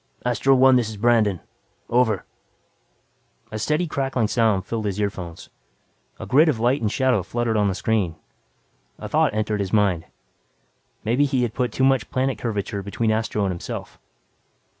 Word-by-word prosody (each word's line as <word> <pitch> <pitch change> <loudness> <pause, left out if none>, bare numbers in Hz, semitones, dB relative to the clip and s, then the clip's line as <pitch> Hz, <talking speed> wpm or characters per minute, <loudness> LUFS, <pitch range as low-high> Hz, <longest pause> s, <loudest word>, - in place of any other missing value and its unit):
"Astro 125 +2 +3
One, 130 0 +6
this 120 -3 0
is 110 - -8
Brandon. 105 -5 +2 0.5
Over." 115 -5 +1 1.3
A 110 - -4
steady 150 +9 0
crackling 135 -7 -1
sound 110 -6 +2
filled 110 0 -3
his 100 0 -2
earphones; 95 -5 -4 0.7
a - - -6
grid 150 +6 +4
of 125 -7 0
light 125 +5 +2
and 105 -2 0
shadow 130 -5 +2
fluttered 115 +4 -2
on 105 -1 +2
the 95 - -1
screen. 100 -6 0 0.8
A - - -7
thought - - +1
entered 110 -1 -1
his 95 -2 -2
mind. 100 -6 +2 1.0
Maybe 120 +6 +2
he 130 -3 0
had 115 -2 -2
put 125 -3 -1
too 130 - -1
much 135 -5 +2
planet 130 -3 -1
curvature 105 -3 -3
between 110 +3 -1
Astro 110 -1 -1
and 95 - 0
himself. 85 - -7
110 Hz, 160 wpm, -23 LUFS, 105-125 Hz, 1.3 s, One